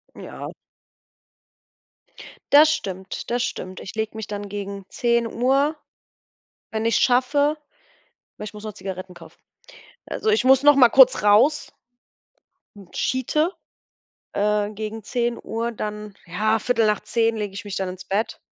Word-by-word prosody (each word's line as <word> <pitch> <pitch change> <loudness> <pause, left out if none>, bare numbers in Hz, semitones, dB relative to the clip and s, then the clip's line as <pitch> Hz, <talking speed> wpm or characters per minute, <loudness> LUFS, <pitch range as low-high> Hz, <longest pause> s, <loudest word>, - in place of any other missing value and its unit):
Ja. - - -8 2.0
Das 300 +2 +8
stimmt, 190 -10 -6
das 240 0 +1
stimmt. 185 -7 -5
Ich 190 - -9
lege 220 0 -3
mich 220 -2 -6
dann 205 -1 -6
gegen 200 -1 -6
10:00, 245 +5 +1 1.0
wenn 220 0 -3
ich's 230 -1 +2
schaffe, 285 +4 +2 0.8
weil 210 - -7
ich 210 - -8
muss 210 0 -10
noch 215 -1 -6
Zigaretten 190 -2 -7
kaufen. 165 -2 -15 0.7
Also, 440 - -2
ich 435 - +3
muss 265 +1 +5
noch 290 0 +7
mal 255 -3 +7
kurz 260 -2 +6
raus 215 +9 +3 1.2
schite, 305 +7 0 0.8
äh, 210 0 0
gegen 215 0 -6
10:00, 235 -1 -2
dann, 210 -1 -6
ja, 215 +6 +1
10:15 225 0 +1
lege 205 -2 -4
ich 200 - -7
mich 205 -2 -6
dann 190 -1 -2
ins 185 0 -8
Bett. 205 +4 -2
220 Hz, 130 wpm, -23 LUFS, 205-250 Hz, 2.0 s, Das